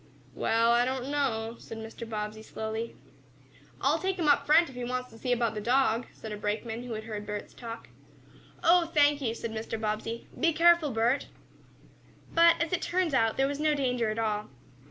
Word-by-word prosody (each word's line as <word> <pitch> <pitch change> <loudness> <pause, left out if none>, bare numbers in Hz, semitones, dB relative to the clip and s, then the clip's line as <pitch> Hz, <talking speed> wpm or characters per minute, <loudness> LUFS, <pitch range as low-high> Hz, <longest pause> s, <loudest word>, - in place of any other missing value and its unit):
"Well, 230 +1 +2
I 240 +1 +4
don't 260 +1 -2
know," 235 -6 -1
said 225 - -9
Mr. 225 +1 -8
Bobbsey, 215 0 -4
slowly. 220 +1 -5 0.8
"I'll - - +2
take 380 0 -1
him 335 -4 0
up 290 - +4
front, 325 +3 +6
if 265 - -11
he 250 0 -5
wants 250 +1 -3
to 225 - -13
see 250 - -2
about 235 -2 +1
the 210 - -4
dog," 245 0 +2
said 220 - -9
a 210 - -4
brakeman 220 +3 -3
who 245 -1 -6
had 215 0 -5
heard 215 -2 -5
Bert's 210 0 -6
talk. 230 -1 -8 0.8
"Oh, 340 0 +5
thank 290 -1 +4
you," 230 -3 -1
said 230 -1 -5
Mr. 220 0 -4
Bobbsey. 220 +2 -3
"Be 330 0 +3
careful, 340 -1 +5
Bert." 235 +3 +1 1.1
But, 335 0 +6
as 335 +1 -1
it 360 - +1
turned 345 -2 0
out, 225 -4 +2
there 270 0 +3
was 285 +1 -3
no 305 0 +2
danger 250 -5 0
at 215 - -3
all. 215 -2 -1
240 Hz, 195 wpm, -29 LUFS, 220-290 Hz, 1.1 s, front